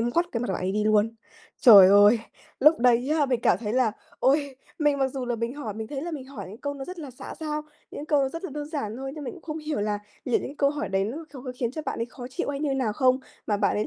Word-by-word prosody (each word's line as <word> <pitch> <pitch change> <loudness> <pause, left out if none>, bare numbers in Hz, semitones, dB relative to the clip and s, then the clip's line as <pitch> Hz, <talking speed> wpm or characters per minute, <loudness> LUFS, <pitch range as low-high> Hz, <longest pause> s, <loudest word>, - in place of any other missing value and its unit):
ngoắt 240 +10 +1
cái 230 - -1
mặt 245 - -3
bạn - - -1
ấy 190 +1 -1
đi 210 0 0
luôn. 215 +1 +3 0.5
Trời 200 -7 +10
ơi! 205 +3 +7 0.4
Lúc 305 +4 +6
đấy 245 +1 +3
á, 290 - +3
mình 250 -3 0
cảm - - +3
thấy 215 -2 -3
là 245 -4 +2 0.3
ôi, 280 0 +2 0.2
mình 295 -2 +2
mặc 270 - +2
dù 260 -1 -5
là 240 -1 -1
mình 230 +3 -3
hỏi 225 -9 -5
mình 220 0 -6
thấy 280 -2 -4
là 345 - -4
mình 285 -5 -6
hỏi 275 0 -8
những 210 - -9
câu 285 0 -3
nó 270 -1 -6
rất 365 -1 -8
là 290 -5 -7
xã 245 - -9
giao, 305 -1 -3 0.3
những 295 - -7
câu 280 -3 +2
rất 330 +6 -7
là - - -4
đơn 290 +1 -5
giản 230 -9 -3
thôi 270 +1 -5
nhưng 300 -2 -7
mình 255 - -5
cũng 355 - -14
không 310 -1 -5
hiểu 305 -6 -3
là 205 0 -1 0.3
liệu 250 - +2
những - - -5
cái 285 - -9
câu 280 -1 +3
hỏi 295 0 -3
đấy 195 0 +1
nó 235 +8 -4 0.2
nó 260 - -7
có 255 - -4
khiến 235 -2 0
cho 310 - -5
bạn - - -2
ấy 230 - -1
khó 245 0 -9
chịu 260 - -3
hay 280 0 -4
như 285 -3 0
nào 245 -6 0
không, 255 +2 +3 0.3
mà 210 - +1
bạn - - +1
ấy 210 - 0
260 Hz, 305 wpm, -26 LUFS, 225-290 Hz, 0.5 s, Trời